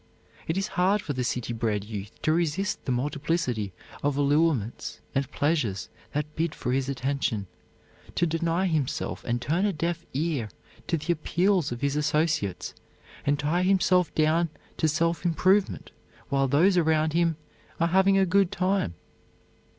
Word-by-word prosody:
It 160 - -1
is 195 +1 -1
hard 195 +3 +4
for 150 - -4
the 130 -1 -1
city 120 -1 -2
bred 110 -3 -1
youth 105 -1 -6
to 155 - +3
resist 170 +4 -1
the 130 - -1
multiplicity 135 - -1 0.3
of 145 -1 0
allurements 145 -5 +1
and 135 -1 0
pleasures 135 - 0 0.2
that 150 +1 -3
bid 165 -1 -1
for 125 - -2
his 135 +1 0
attention, 135 -5 -1 0.7
to 175 - +2
deny 165 +2 0
himself 155 -7 -1
and 120 0 0
turn 155 +10 0
a - - +1
deaf 170 0 -2
ear 145 -7 -1 0.4
to 165 - +1
the 175 +3 0
appeals 175 0 +1
of 120 - -5
his 140 0 0
associates 150 - 0 0.5
and 145 0 +3
tie 150 +5 +1
himself 185 -3 +3
down 160 +2 +3 0.3
to 160 - +2
self 165 +3 +1
improvement 185 +3 +2 0.4
while 135 0 +2
those 170 +8 +4
around 160 -2 +2
him 165 -2 +2 0.4
are 170 0 +2
having 190 +2 +4
a 195 - +4
good 190 0 +3
time. 185 - 0
155 Hz, 155 wpm, -27 LUFS, 135-175 Hz, 0.7 s, hard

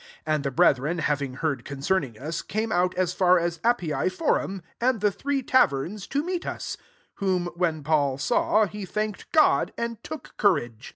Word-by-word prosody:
15 155 - +1
And 150 -2 0
the 140 - 0
brethren 145 +2 +3
hav 150 -3 0
ing 135 -2 -4
heard 140 -5 -2
concerning 140 - -1
us, 155 +6 -4
came 220 +2 -3
out 180 0 +1
as 180 -1 0
far 185 -1 +4
as 170 -1 -1
Appii 180 - +1
forum,* 195 - -1 0.2
and 245 -1 +2
the 210 +1 +2
Three 275 +5 -2
taverns,* 195 - +1
to 285 +2 -1
meet 360 +1 -2
us: - - -4 0.4
whom 185 -3 0
when 165 -4 -1
Paul 145 -3 +1
saw, 215 - +2
he 205 +1 -7
thanked 210 +2 -4
God, 310 -1 +4
and 235 -1 -4
took 315 -4 -8
courage. 120 - +1
180 Hz, 180 wpm, -26 LUFS, 150-215 Hz, 0.4 s, far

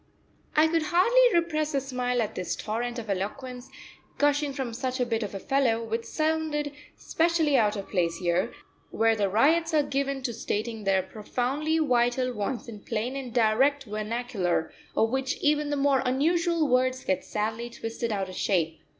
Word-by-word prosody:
I 310 +1 +6
could 330 0 +1
hardly 470 +10 +4
repress 310 -3 -1
a - - +3
smile 250 -2 -1
at 210 - -5
this 180 - -3
torrent 235 +3 -3
of 230 -2 -6
eloquence 245 +6 -4 0.5
gushing 290 0 +2
from 265 -4 -4
such 255 +2 -3
a 250 - +2
bit 230 -1 -1
of 205 -2 -4
a - - -3
fellow, 235 -2 +1
which 230 +1 -3
sounded 310 +1 -1 0.3
specially 325 -3 +1
out 210 -4 +3
of 200 -2 -5
place 170 -4 0
here, 180 +5 0 0.4
where 225 0 +2
the 205 -2 +1
ryots 320 - +3
are 300 - +4
given 275 -1 -2
to 240 -2 -2
stating 220 -1 -3
their 190 -1 +3
profoundly 255 - -2
vital 250 -3 +2
wants 230 +4 -3
in 220 -3 -8
plain 230 +5 -3
and 265 -3 -5
direct 250 +5 +3
vernacular, 215 -5 -2 0.2
of 225 0 +3
which 265 +1 -1
even 295 0 +1
the 290 - -1
more 275 -1 +3
unusual 325 +5 +2
words 255 0 +2
get 190 - 0
sadly 220 +3 -3
twisted 230 0 -4
out 195 -2 -1
of 185 - -8
shape. 165 -5 0
250 Hz, 175 wpm, -27 LUFS, 220-290 Hz, 0.5 s, I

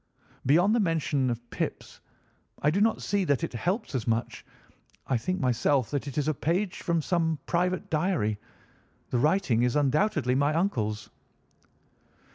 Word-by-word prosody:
Beyond 175 +9 +4
the 235 - +3
mention 145 - +1
of 120 0 -4
pips, - - -4 0.6
I 150 - +4
do 195 +5 +1
not 220 +1 +2
see 200 -1 0
that 140 -6 +1
it - - -3
helps 180 - -2
us 125 -5 -2
much. 115 0 -1 0.6
I 135 - 0
think 185 +11 -1
myself 130 -1 +1
that 145 0 -2
it 140 - -6
is 150 0 0
a 155 - +2
page 175 +7 -1
from 170 -2 0
some 165 -2 0
private 180 +1 0
diary. 155 - 0 0.7
The 125 - +1
writing 150 - +2
is 125 0 +1
undoubtedly 150 - +2
my 145 +3 +2
uncle's." 110 - -1
150 Hz, 155 wpm, -27 LUFS, 125-180 Hz, 0.7 s, Beyond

